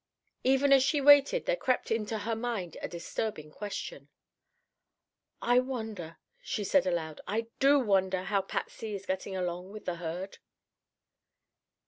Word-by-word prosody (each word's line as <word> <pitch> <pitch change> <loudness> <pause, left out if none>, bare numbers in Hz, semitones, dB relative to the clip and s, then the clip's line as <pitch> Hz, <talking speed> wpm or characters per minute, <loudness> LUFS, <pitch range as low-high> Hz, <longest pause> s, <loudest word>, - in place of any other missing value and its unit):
Even 270 +2 +4
as 270 - +7
she 290 +3 +2
waited 285 - +6
there - - +2
crept 260 - 0
into 220 0 0
her 225 +2 -2
mind 225 -7 -3
a - - -2
disturbing 170 -2 -4
question: 150 -7 -6 1.3
"I 245 +1 +5
wonder," 220 -10 -5 0.2
she 210 - -3
said 270 +3 +3
aloud, 160 -4 -2
"I 225 +2 -2
do 280 +1 +6
wonder 190 -5 +2
how 200 +1 +1
Patsy 210 +2 -4
is 195 0 -7
getting 190 0 -3
along 180 +1 -3
with 215 0 -9
the 175 -1 -2
herd?" 175 +3 -5
210 Hz, 140 wpm, -30 LUFS, 180-250 Hz, 1.3 s, as